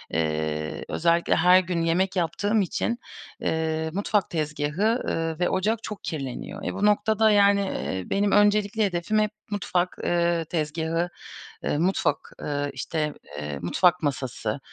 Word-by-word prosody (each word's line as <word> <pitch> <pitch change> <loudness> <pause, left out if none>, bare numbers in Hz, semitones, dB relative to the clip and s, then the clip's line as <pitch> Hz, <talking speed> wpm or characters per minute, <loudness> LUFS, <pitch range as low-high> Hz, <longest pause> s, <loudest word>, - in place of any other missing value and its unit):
ııı, 75 -1 -1
özellikle 170 +1 +2
her 180 +1 +6
gün 175 -2 -1
yemek 180 +4 +1
yaptığım 205 +5 +1
için, 235 +6 -1 0.4
ııı, 160 0 0
mutfak 205 +1 0
tezgâhı, 155 +9 0
ııı, 165 0 -2
ve 180 - +2
ocak 215 +4 0
çok 210 - -6
kirleniyor. 145 +6 -5
Eee, - - -2
bu 205 - 0
noktada, 215 +1 +3
yani, 200 -1 +5
eee, 95 - -3
benim 200 0 +1
öncelikli 205 +1 +3
hedefim 195 +3 0
hep 215 0 +1 0.2
mutfak, 180 -3 -1
ııı, 170 -1 +1
tezgâhı, 165 +2 -1 0.6
ııı, 145 - 0
mutfak, 185 +3 0
ııı, 145 -1 -2
işte, 150 -2 -2 0.3
eee, 75 -1 -4
mutfak 175 - +2
masası, 130 -3 -2
175 Hz, 140 wpm, -25 LUFS, 150-200 Hz, 0.6 s, her